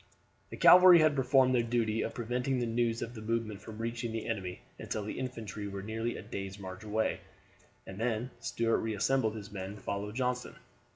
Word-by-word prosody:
The -, -, -8 dB
cavalry 180 Hz, 0 st, +9 dB
had 155 Hz, -2 st, +4 dB
performed 130 Hz, -1 st, +4 dB
their 125 Hz, -, +4 dB
duty 115 Hz, -2 st, 0 dB
of -, -, -3 dB
preventing 125 Hz, +3 st, -1 dB
the 120 Hz, -, 0 dB
news 115 Hz, 0 st, 0 dB
of 115 Hz, -, -6 dB
the 110 Hz, -, -8 dB
movement 110 Hz, -2 st, -2 dB
from 110 Hz, -1 st, -9 dB
reaching 115 Hz, +1 st, -3 dB
the 115 Hz, 0 st, -4 dB
enemy 95 Hz, -5 st, -4 dB, 0.2 s
until 105 Hz, -, -3 dB
the 105 Hz, -, -5 dB
infantry 115 Hz, -5 st, -5 dB
were 100 Hz, -1 st, -6 dB
nearly 115 Hz, +3 st, -3 dB
a -, -, -8 dB
day's 95 Hz, 0 st, -6 dB
march 95 Hz, 0 st, -8 dB
away, 110 Hz, +1 st, -1 dB, 0.7 s
and 95 Hz, +1 st, -9 dB
then 115 Hz, +1 st, -1 dB
Stuart 115 Hz, -1 st, 0 dB
reassembled 110 Hz, +1 st, 0 dB
his 105 Hz, -1 st, -8 dB
men 95 Hz, -1 st, -5 dB
and 105 Hz, -, -11 dB
followed 105 Hz, +1 st, -4 dB
Johnston. 125 Hz, -1 st, -2 dB
115 Hz, 190 wpm, -31 LUFS, 105-125 Hz, 0.7 s, cavalry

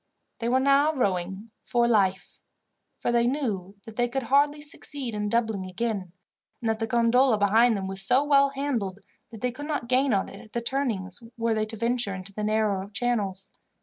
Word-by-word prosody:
They 235 Hz, 0 st, -1 dB
were 255 Hz, +2 st, +3 dB
now 280 Hz, +3 st, +4 dB
rowing 195 Hz, -, -2 dB
for 240 Hz, -1 st, +1 dB
life, 195 Hz, -4 st, +1 dB, 0.6 s
for -, -, -1 dB
they 235 Hz, 0 st, +3 dB
knew 210 Hz, -9 st, -2 dB
that 225 Hz, -2 st, -11 dB
they 240 Hz, 0 st, +2 dB
could 265 Hz, +2 st, -2 dB
hardly 285 Hz, +4 st, +3 dB
succeed 285 Hz, -4 st, -4 dB
in 210 Hz, 0 st, -2 dB
doubling 220 Hz, -3 st, 0 dB
again, 195 Hz, -1 st, -3 dB, 0.5 s
and 230 Hz, -, -3 dB
that 220 Hz, -, -3 dB
the 225 Hz, -, -1 dB
gondola 235 Hz, +1 st, +3 dB
behind 220 Hz, +3 st, +4 dB
them 190 Hz, -, -4 dB
was 190 Hz, 0 st, -3 dB
so 250 Hz, +8 st, +3 dB
well 280 Hz, -1 st, +4 dB
handled, 245 Hz, -9 st, -3 dB, 0.3 s
that 225 Hz, -, -11 dB
they 250 Hz, 0 st, 0 dB
could 290 Hz, +4 st, -7 dB
not 295 Hz, -6 st, -2 dB
gain 260 Hz, +2 st, +2 dB
on 195 Hz, -3 st, +1 dB
it 195 Hz, -, -11 dB
at 215 Hz, -, -17 dB
the 235 Hz, -, 0 dB
turnings 230 Hz, -8 st, -1 dB, 0.2 s
were 230 Hz, 0 st, +1 dB
they 215 Hz, 0 st, 0 dB
to 225 Hz, +1 st, -6 dB
venture 235 Hz, -2 st, 0 dB
into 190 Hz, +1 st, -9 dB
the 210 Hz, -, -4 dB
narrow 210 Hz, -2 st, 0 dB
channels. 205 Hz, -4 st, -2 dB
230 Hz, 195 wpm, -26 LUFS, 200-255 Hz, 0.6 s, now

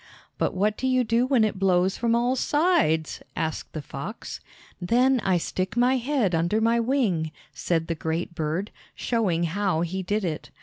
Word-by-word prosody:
"But -, -, 0 dB
what 210 Hz, +3 st, +1 dB
do 260 Hz, -, -1 dB
you 255 Hz, -1 st, +3 dB
do 235 Hz, +2 st, +1 dB
when 260 Hz, -4 st, +3 dB
it 210 Hz, -3 st, -1 dB
blows 185 Hz, 0 st, +2 dB
from 235 Hz, 0 st, +1 dB
all 245 Hz, +2 st, +2 dB
sides?" 260 Hz, -, +1 dB
asked 160 Hz, -1 st, -3 dB
the 155 Hz, -, -5 dB
fox. 155 Hz, +11 st, -7 dB, 0.4 s
"Then 250 Hz, +7 st, +3 dB
I 190 Hz, -4 st, +2 dB
stick 185 Hz, +5 st, -3 dB
my 250 Hz, +2 st, +4 dB
head 250 Hz, -7 st, 0 dB
under 170 Hz, +6 st, +1 dB
my 230 Hz, +1 st, +2 dB
wing," 225 Hz, -, 0 dB, 0.2 s
said 165 Hz, -2 st, -1 dB
the 165 Hz, -, -2 dB
great 160 Hz, +2 st, -3 dB
bird, 165 Hz, +5 st, -2 dB, 0.2 s
showing 195 Hz, -8 st, 0 dB
how 180 Hz, 0 st, 0 dB
he 180 Hz, +3 st, -2 dB
did 205 Hz, +2 st, -1 dB
it. 160 Hz, -3 st, -4 dB
195 Hz, 175 wpm, -25 LUFS, 170-240 Hz, 0.4 s, my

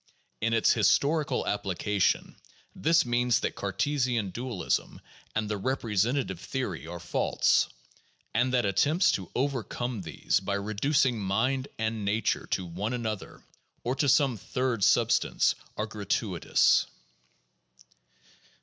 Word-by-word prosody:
In 115 Hz, +1 st, +1 dB
its 115 Hz, -, +4 dB
historical 140 Hz, +6 st, +2 dB
application, 100 Hz, 0 st, 0 dB, 0.4 s
this 165 Hz, +2 st, +3 dB
means 120 Hz, -1 st, +2 dB
that -, -, -1 dB
Cartesian 120 Hz, +1 st, -1 dB
dualism 120 Hz, -2 st, -2 dB, 0.4 s
and 110 Hz, -1 st, 0 dB
the 105 Hz, 0 st, -2 dB
representative 115 Hz, -3 st, 0 dB
theory 95 Hz, -, -4 dB
are 85 Hz, +1 st, -6 dB
false; 85 Hz, -, +1 dB, 0.6 s
and 125 Hz, +1 st, +2 dB
that 125 Hz, -2 st, +2 dB
attempts 150 Hz, -, +3 dB
to 95 Hz, -, -3 dB
over 135 Hz, -1 st, 0 dB
come 120 Hz, -2 st, -4 dB
these 80 Hz, -5 st, 0 dB
by 100 Hz, +1 st, -2 dB
reducing 115 Hz, +5 st, +1 dB
mind 130 Hz, +8 st, 0 dB
and 110 Hz, -1 st, -2 dB
nature 105 Hz, +1 st, 0 dB
to 95 Hz, -, -1 dB
one 95 Hz, +7 st, -3 dB
another 110 Hz, -4 st, -5 dB, 0.4 s
or 125 Hz, +2 st, -1 dB
to 140 Hz, 0 st, +2 dB
some 130 Hz, -2 st, +3 dB
third 125 Hz, +1 st, -2 dB
substance, -, -, +3 dB, 0.2 s
are 105 Hz, -, -1 dB
gratuitous. 105 Hz, -3 st, +1 dB
115 Hz, 120 wpm, -28 LUFS, 100-130 Hz, 0.6 s, its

